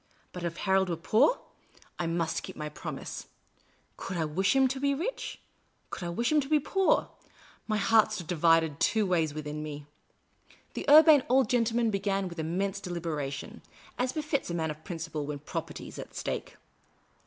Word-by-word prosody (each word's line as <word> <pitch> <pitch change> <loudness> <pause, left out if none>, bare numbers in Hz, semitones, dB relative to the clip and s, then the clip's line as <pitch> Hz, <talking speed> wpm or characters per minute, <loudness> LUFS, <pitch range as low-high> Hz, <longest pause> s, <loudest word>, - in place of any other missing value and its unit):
But, 180 - -7
if 170 0 -3
Harold 190 -1 +2
were 170 - 0
poor 215 - +3 0.3
— - - -28
I 175 - -1
must 165 -1 -1
keep - - -8
my 150 0 -5
promise. 150 - -7 0.7
Could 185 - -5
I 160 - 0
wish 185 - +1
him 265 -1 +5
to 265 +1 -3
be 280 0 +1
rich? 405 - -4 0.5
Could - - -5
I 175 - -3
wish 235 - 0
him 305 -1 +4
to 270 - -7
be 305 -1 +4
poor? 385 +6 +2 0.6
My 215 -1 +1
heart 220 +1 +4
stood 200 -5 -4
divided 165 -2 +3
two 220 -1 +2
ways 165 -5 +1
within 150 0 -5
me. 150 -1 -6 0.9
The - - -3
Urbane 310 -1 +9
Old 260 -2 +3
Gentleman 230 -1 +2
began 195 -1 0
with 170 -1 -8
immense 190 +5 -1
delibera 165 -6 -3
tion, 135 - -8 0.4
as 250 +1 +1
befits 300 - -2
a 170 - -2
man 160 -2 -1
of 150 +1 -10
principle 165 -4 -5
when 150 -1 -3
Property 145 - -6
is - - -10
at - - -9
stake. - - -4
185 Hz, 185 wpm, -29 LUFS, 160-240 Hz, 0.9 s, Urbane